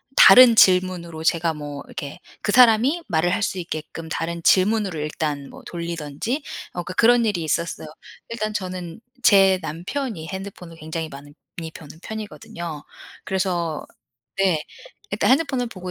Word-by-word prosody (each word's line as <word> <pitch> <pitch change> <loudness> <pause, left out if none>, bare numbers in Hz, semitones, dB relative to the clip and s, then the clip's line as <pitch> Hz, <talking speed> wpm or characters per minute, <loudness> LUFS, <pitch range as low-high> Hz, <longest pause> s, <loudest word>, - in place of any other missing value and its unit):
다른 250 -2 +9
질문으로 180 -5 +3
제가 165 0 +2
뭐 145 -1 -7
이렇게 140 -1 -8 0.2
그 - - 0
사람이 250 +7 +5
말을 175 -1 +1
할 220 - -1
수 190 - -1
있게끔 160 -1 -6
다른 165 +1 -3
질문으로 195 -2 +3
일단 150 -2 -3
뭐 - - -13
돌리든지 170 - -4 0.3
어 175 - -4
그러니까 185 - -7
그런 235 +4 +4
일이 205 -6 0
있었어요. 160 +1 -2 0.4
일단 215 -2 -3
저는 185 -2 -5 0.2
제 195 -2 +6
남편이 175 - -4
핸드폰을 190 -3 -8
굉장히 160 0 -5
많이 145 0 -12 0.4
보는 155 0 -12
편이거든요. 170 -7 -7 0.4
그래서 175 -5 -1 0.6
네. 180 -6 +2 0.5
일단 - - +1
핸드폰을 265 -3 +2
보고 185 -4 -8
175 Hz, 320 characters per minute, -22 LUFS, 160-210 Hz, 0.6 s, 다른